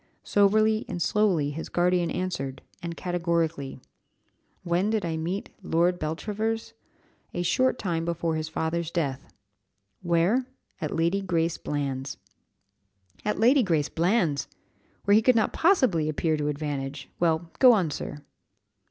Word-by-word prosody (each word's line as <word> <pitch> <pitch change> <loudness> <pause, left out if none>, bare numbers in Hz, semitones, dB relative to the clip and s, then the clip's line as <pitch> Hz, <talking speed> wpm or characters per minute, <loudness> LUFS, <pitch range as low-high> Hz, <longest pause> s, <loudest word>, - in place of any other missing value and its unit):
Soberly 215 +2 +3
and 175 - -3
slowly 175 -6 +2
his 160 +3 -6
guardian 175 -1 +2
answered, 135 -8 -3 0.2
and 170 -1 -5
categorically, 165 -6 -1 0.8
"When 180 +3 +1
did 215 -4 0
I 165 -1 -2
meet 175 +5 -3
Lord 175 0 +1
Beltravers? 215 +8 -3 0.6
A 175 - -1
short 255 +8 +2
time 170 -6 -2
before 170 -1 -1
his 155 0 -3
father's 160 +1 -2
death. 140 -6 -3 0.7
Where? 180 +9 +2 0.3
At 155 - -2
Lady 170 +4 +1
Grace 170 -3 0
Bland's." 135 -2 -3 1.1
"At 210 - -1
Lady 255 +5 +5
Grace 160 - +1
Bland's! 170 -5 +1 0.6
where 200 - +4
he 215 - +6
could 250 +2 +4
not 220 - +2
possibly 255 - +3
appear 155 +1 0
to 150 -1 -2
advantage! 140 -2 -3
Well, 165 0 +1
go 255 -2 +9
on, 185 -9 +2
sir." 145 +1 -5
170 Hz, 135 wpm, -27 LUFS, 155-200 Hz, 1.1 s, go